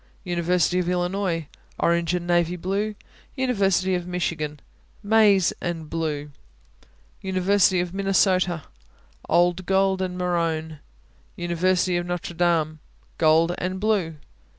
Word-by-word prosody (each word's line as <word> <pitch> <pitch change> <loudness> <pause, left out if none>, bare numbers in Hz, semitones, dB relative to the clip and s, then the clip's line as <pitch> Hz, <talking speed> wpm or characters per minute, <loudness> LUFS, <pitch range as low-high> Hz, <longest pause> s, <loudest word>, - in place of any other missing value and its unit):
University 180 0 +1
of 180 -1 -1
Illinois 180 -2 -1 0.3
Orange 170 0 +1
and 175 -1 -3
navy 175 0 +1
blue. 200 +4 -2 0.4
University 195 -8 +1
of 180 -1 -2
Michigan 165 -4 -3 0.4
Maize 205 -3 +4
and 165 -3 -4
blue. 150 -3 -3 0.9
University 190 0 +2
of 175 0 -2
Minnesota 185 -3 +1 0.7
Old 175 +1 +2
gold 190 0 +2
and 180 -1 -3
maroon. 165 -3 -1 0.6
University 175 +1 +1
of 175 0 -3
Notre 175 -1 -4
Dame 165 -3 +1 0.4
Gold 165 +2 +4
and 185 +1 -3
blue. 200 -6 0
180 Hz, 110 wpm, -24 LUFS, 170-190 Hz, 0.9 s, Maize